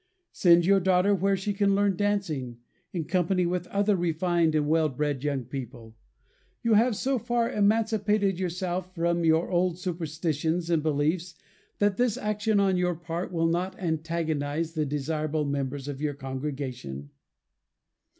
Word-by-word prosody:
Send 170 Hz, -1 st, +5 dB
your 195 Hz, +1 st, +5 dB
daughter 190 Hz, +2 st, +3 dB
where 195 Hz, +1 st, +1 dB
she 200 Hz, +2 st, -2 dB
can 200 Hz, 0 st, +2 dB
learn 200 Hz, -1 st, +2 dB
dancing, 170 Hz, -12 st, -1 dB, 0.3 s
in 170 Hz, -3 st, -2 dB
company 180 Hz, 0 st, +1 dB
with 180 Hz, 0 st, -2 dB
other 200 Hz, +1 st, +1 dB
refined 170 Hz, -1 st, +1 dB
and 150 Hz, -1 st, +1 dB
well 160 Hz, 0 st, +3 dB
bred 145 Hz, 0 st, -2 dB
young 140 Hz, -3 st, -1 dB
people. 120 Hz, -4 st, -8 dB, 0.7 s
You 230 Hz, -, +3 dB
have 225 Hz, +2 st, +4 dB
so 265 Hz, +4 st, 0 dB
far 235 Hz, 0 st, 0 dB
emancipated 210 Hz, -2 st, +1 dB
yourself 180 Hz, 0 st, -3 dB
from 170 Hz, 0 st, 0 dB
your 160 Hz, +2 st, +2 dB
old 175 Hz, -1 st, +1 dB
superstitions 165 Hz, -1 st, -2 dB
and 165 Hz, -2 st, +3 dB
beliefs 160 Hz, +3 st, 0 dB, 0.4 s
that 205 Hz, -1 st, +1 dB
this 245 Hz, -3 st, +1 dB
action 210 Hz, 0 st, 0 dB
on 190 Hz, -2 st, +2 dB
your 180 Hz, -1 st, +1 dB
part 170 Hz, +2 st, -5 dB
will 165 Hz, -2 st, 0 dB
not 180 Hz, +3 st, -1 dB
antagonize 160 Hz, -2 st, -2 dB
the 155 Hz, -2 st, -1 dB
desirable 150 Hz, +1 st, -1 dB
members 140 Hz, -1 st, -3 dB
of 145 Hz, -1 st, -5 dB
your 150 Hz, -2 st, -1 dB
congregation. 130 Hz, -, -5 dB
170 Hz, 150 wpm, -27 LUFS, 150-195 Hz, 0.7 s, Send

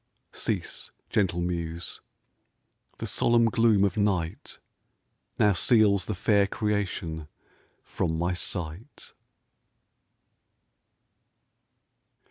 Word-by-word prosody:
Cease, -, -, -3 dB, 0.2 s
gentle 90 Hz, -4 st, +1 dB
muse! 85 Hz, -1 st, -4 dB, 1.0 s
the -, -, -5 dB
solemn 120 Hz, 0 st, +3 dB
gloom 115 Hz, -3 st, +3 dB
of 100 Hz, -1 st, +1 dB
night 95 Hz, -6 st, -1 dB, 0.8 s
Now 105 Hz, -1 st, +4 dB
seals 100 Hz, -1 st, +3 dB
the 105 Hz, -, -2 dB
fair 100 Hz, +1 st, +3 dB
creation 95 Hz, -7 st, -2 dB, 0.6 s
from 80 Hz, -1 st, -2 dB
my 90 Hz, +2 st, 0 dB
sight. 90 Hz, -, -6 dB
100 Hz, 80 wpm, -27 LUFS, 85-105 Hz, 1.0 s, Now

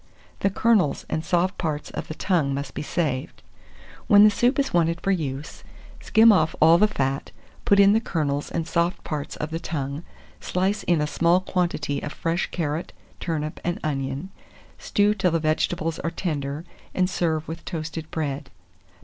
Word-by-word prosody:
The 195 Hz, -, +2 dB
kernels 205 Hz, -6 st, +2 dB
and 160 Hz, -, -1 dB
soft 180 Hz, +3 st, 0 dB
parts 155 Hz, -4 st, -3 dB
of -, -, -5 dB
the 155 Hz, -, -6 dB
tongue 160 Hz, -8 st, +1 dB
must 140 Hz, -1 st, -5 dB
be -, -, -4 dB
saved. 150 Hz, -4 st, -2 dB, 0.6 s
When 205 Hz, -3 st, +8 dB
the 210 Hz, -, +7 dB
soup 245 Hz, +5 st, +2 dB
is 280 Hz, -1 st, 0 dB
wanted 170 Hz, 0 st, +2 dB
for 195 Hz, -, 0 dB
use, 150 Hz, -4 st, -3 dB, 0.4 s
skim 225 Hz, 0 st, +6 dB
off 160 Hz, -6 st, +2 dB
all 165 Hz, +2 st, +6 dB
the 210 Hz, -, +5 dB
fat, 135 Hz, -9 st, -2 dB, 0.4 s
put 200 Hz, -, +4 dB
in 200 Hz, 0 st, +7 dB
the 220 Hz, -, +4 dB
kernels 145 Hz, -9 st, -2 dB
and 165 Hz, -1 st, -3 dB
soft 170 Hz, +1 st, 0 dB
parts 150 Hz, -1 st, -4 dB
of 150 Hz, +1 st, -5 dB
the 165 Hz, -, -2 dB
tongue, 145 Hz, -3 st, -4 dB, 0.4 s
slice 195 Hz, +3 st, -1 dB
in 170 Hz, -3 st, +1 dB
a -, -, +1 dB
small 170 Hz, +3 st, +3 dB
quantity 170 Hz, -6 st, -1 dB
of 145 Hz, -, -5 dB
fresh 170 Hz, +1 st, -1 dB
carrot, 160 Hz, -1 st, -3 dB, 0.3 s
turnip, 155 Hz, -2 st, -3 dB
and 175 Hz, 0 st, -2 dB
onion; 140 Hz, +4 st, -3 dB, 0.5 s
stew 205 Hz, 0 st, +2 dB
till 190 Hz, -3 st, +1 dB
the 165 Hz, 0 st, +1 dB
vegetables 155 Hz, +1 st, 0 dB
are 165 Hz, -, -1 dB
tender, 150 Hz, -3 st, -3 dB, 0.3 s
and 185 Hz, -1 st, +3 dB
serve 160 Hz, -4 st, -1 dB
with 165 Hz, +1 st, -6 dB
toasted 160 Hz, -2 st, -5 dB
bread. 145 Hz, -3 st, -3 dB
165 Hz, 175 wpm, -24 LUFS, 150-185 Hz, 0.6 s, When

